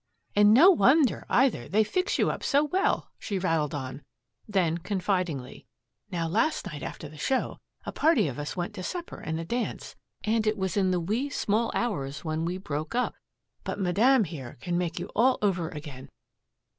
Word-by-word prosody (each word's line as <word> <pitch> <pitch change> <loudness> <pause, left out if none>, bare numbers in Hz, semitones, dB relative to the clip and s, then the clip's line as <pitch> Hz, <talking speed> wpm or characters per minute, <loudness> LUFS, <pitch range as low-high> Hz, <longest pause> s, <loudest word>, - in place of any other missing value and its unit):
"And 205 0 +6
no 315 - +8
wonder, 295 -4 +3
either; 265 0 +2
they 215 +3 +4
fix 365 - 0
you - - +2
up - - -6
so 285 +1 +3
well," 380 +7 0
she 200 - -3
rattled 165 -5 0
on; 135 0 -5 0.5
then 175 -5 +1
confidingly, 180 -7 -2 0.4
"Now, 170 -2 -2
last 310 - +1
night 150 -6 -6
after 150 - -6
the 150 +1 -13
show 265 - -1 0.3
a - - -3
party 295 - +3
of 135 0 -5
us 145 +5 -5
went 175 -1 -3
to - - -6
supper 345 - -5
and 160 +1 -3
a 165 - -4
dance 240 +7 -3 0.3
and 220 0 +1
it 215 0 +1
was 190 -3 -2
in 195 -2 +2
the 180 -1 +1
wee 220 +11 -1
small 225 -3 0
hours 145 - -2
when 160 +1 -1
we 180 +2 -2
broke 155 0 -4
up. 250 - +1 0.5
But - - -4
Madame 220 +7 +4
here 145 -8 -7
can 175 +5 -3
make 175 -1 -1
you 175 - -3
all 255 +3 +4
over 185 -5 0
again. 145 -4 -9
185 Hz, 185 wpm, -27 LUFS, 160-235 Hz, 0.5 s, no